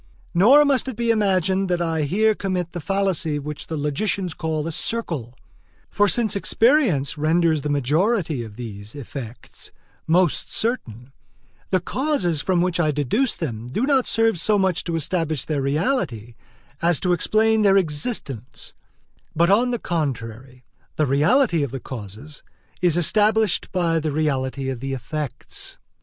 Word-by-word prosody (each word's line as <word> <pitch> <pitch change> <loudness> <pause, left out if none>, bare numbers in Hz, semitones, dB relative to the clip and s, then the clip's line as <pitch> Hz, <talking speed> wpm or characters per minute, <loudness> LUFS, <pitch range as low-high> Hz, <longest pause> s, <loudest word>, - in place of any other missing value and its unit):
Nor 250 +12 +6
must 270 -3 +1
it 260 - -4
be 235 +1 +1
imagined 195 -3 +1
that 175 -1 +1
I 165 -3 0
here 215 +8 +2
commit 185 -4 -3
the 175 - -5
fallacy 170 -2 -1
which 150 0 -6
the 160 - -4
logicians 170 +5 -1
call 160 -2 -3
a 165 - -3
circle; 155 - -2 0.6
for 205 0 +3
since 220 +3 +1
experience 205 - +2
renders 160 0 +2
the 150 - -3
majority 155 - +1
of 110 -2 -10
these 105 -2 -8
effects 125 -3 -8 0.4
most 175 0 +2
certain, 130 - -3 0.6
the 185 - +2
causes 185 - -1
from 180 -1 +1
which 180 -1 -1
I 155 -3 +2
deduce 150 - 0
them 120 -8 -5
do 210 - -1
not 270 -3 +2
serve 225 -5 +2
so 210 +5 +2
much 190 -3 +1
to 170 - -2
establish 160 -3 -1
their 150 -3 -1
reality 140 - -1 0.5
as 170 -1 +2
to 180 -1 +2
explain 220 +5 +2
their 195 -2 +5
existence; 145 - -3 0.6
but 170 +3 +3
on 235 +5 +4
the 240 - -1
contrary, 130 - -4 0.3
the 155 - +2
reality 165 - +3
of 140 - -1
the 135 +2 -5
causes 120 +5 -9 0.4
is 175 -2 +3
established 215 +3 +2
by 170 -3 +1
the 155 -1 -2
reality 135 -3 -1
of 130 -2 -3
the 135 +2 -4
effects. 140 +2 -6
165 Hz, 150 wpm, -22 LUFS, 140-200 Hz, 0.6 s, Nor